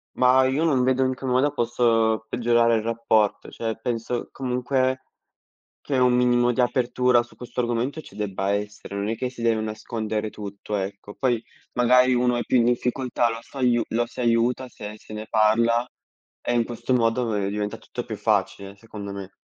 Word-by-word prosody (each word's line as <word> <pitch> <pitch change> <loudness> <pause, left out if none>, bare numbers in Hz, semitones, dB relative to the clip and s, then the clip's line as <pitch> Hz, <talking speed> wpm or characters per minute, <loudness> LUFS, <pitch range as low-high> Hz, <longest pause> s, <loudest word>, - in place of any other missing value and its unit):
Mah, 130 +1 +5
io 135 +5 +1
non 135 -6 +3
vedo 130 +1 +2
in 130 - 0
che 135 - -8
modo 130 +3 +2
posso 115 -3 +1
peggiorare 120 -1 +3
il 110 - 0
rapporto, 115 -2 +1
cioè, 115 -1 -3
penso, 120 0 -3
comunque, 130 0 -1 0.8
che 135 -3 -1
un 125 -1 +4
minimo 125 0 +3
di 120 - -4
apertura 125 0 +3
su 120 - -13
questo 125 0 -7
argomento 120 +6 -1
ci 100 - -15
debba 100 -2 -2
essere, 105 -1 -5
non 100 +2 -2
è 115 - -1
che 125 +3 -3
si 120 -2 -9
deve 115 -1 +2
nascondere 110 0 -3
tutto, 100 0 -6
ecco. 100 +1 -5
Poi, 120 -4 0 0.3
magari, 125 +1 +4
uno 125 0 +2
è - - 0
più - - +2
in 120 - +4
difficoltà, 125 0 +1
lo 115 - -4
s'aiu 125 -3 +1
lo 120 +1 0
si 120 - -7
aiuta 120 +2 +1
se 105 -1 -8
se 110 - -13
ne 110 0 -6
parla 115 +3 +3 0.5
e, 120 - -1
in 120 -1 +3
questo 120 +2 -3
modo, 115 +1 +1
ve 105 -3 -1
diventa 105 0 -3
tutto - - -7
più - - -6
facile, 100 0 -1
secondo 100 -1 -8
me. 100 -1 -7
120 Hz, 185 wpm, -24 LUFS, 110-125 Hz, 0.8 s, Mah